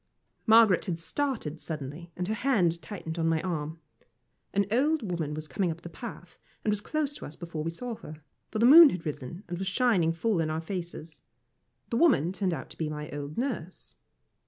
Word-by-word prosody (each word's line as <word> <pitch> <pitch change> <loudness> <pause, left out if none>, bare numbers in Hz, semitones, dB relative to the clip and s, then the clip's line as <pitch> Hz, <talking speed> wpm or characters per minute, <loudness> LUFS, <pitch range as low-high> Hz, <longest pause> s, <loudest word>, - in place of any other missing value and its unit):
Margaret 220 -4 +6
had 170 -3 -2
started 170 - -2
suddenly, 155 +2 -6
and 180 0 -3
her 215 - 0
hand 195 -10 +2
tightened 165 -1 -6
on 165 - +1
my 165 -1 +2
arm. 160 -3 -3 0.7
An 200 0 +2
old 290 +4 +2
woman 170 -6 -2
was 155 0 -5
coming 175 +6 0
up 165 +1 -5
the 170 - -8
path, 235 +8 -9 0.3
and 215 - +3
was 210 -1 +1
close 295 +4 -1
to - - -8
us 150 - -9
before 165 -3 -5
we 165 - -1
saw 240 +8 -5
her, 155 0 -11 0.3
for - - -4
the 230 - +4
moon 310 +4 +11
had 180 -7 -5
risen, 150 +5 -5
and 175 0 -4
was 190 - -2
shining 195 -6 +3
full 185 +3 0
in 155 - -1
our 155 +1 -1
faces. 165 -4 -6 0.7
The 230 - +1
woman 180 - +4
turned 190 0 -1
out 140 -6 -5
to - - -13
be 160 -2 -1
my 150 0 -6
old 145 +1 -6
nurse. 230 - -4
170 Hz, 205 wpm, -29 LUFS, 160-220 Hz, 0.7 s, moon